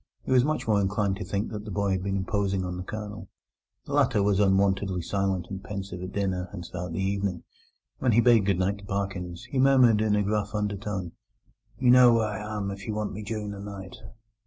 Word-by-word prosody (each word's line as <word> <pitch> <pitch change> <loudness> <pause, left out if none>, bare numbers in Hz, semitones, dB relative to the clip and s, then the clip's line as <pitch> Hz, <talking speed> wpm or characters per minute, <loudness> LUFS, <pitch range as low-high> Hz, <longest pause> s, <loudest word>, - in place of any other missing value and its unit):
He - - -5
was 125 -1 +5
much 155 -2 -1
more 105 -2 +3
inclined 100 0 0
to 105 - -5
think 100 +2 -2
that 105 -2 -5
the 105 - -8
boy 100 0 0
had 95 -1 0
been 100 0 -1
imposing 95 -1 -1
on 90 0 -4
the 90 - -5
Colonel. 105 +1 -7 0.6
The - - -6
latter 105 -2 +3
was 100 -1 +2
unwontedly 95 -2 +2
silent 95 -2 -1
and 95 0 -6
pensive 95 -3 -6
at 90 +1 -5
dinner 95 -3 -2
and 90 -3 -7
throughout 90 -1 -6
the 85 - -3
evening. 95 -2 -1 0.6
When 125 - +2
he 115 - +5
bade 115 -4 +5
goodnight 100 +1 +1
to 100 - -12
Parkins, 95 -4 -3
he 135 - 0
murmured 130 -5 +5
in 110 -1 +2
a 105 - +2
gruff 105 0 -1
undertone: 105 -3 -3 0.7
"You 125 -1 +4
know 125 -1 +8
where 115 -1 +2
I 105 - -4
am 105 -1 -3
if 100 0 -8
you 110 - -2
want 105 -1 -2
me 105 - -6
during 105 -1 -4
the 100 - -7
night." 100 -2 -8
100 Hz, 220 wpm, -27 LUFS, 95-105 Hz, 0.7 s, know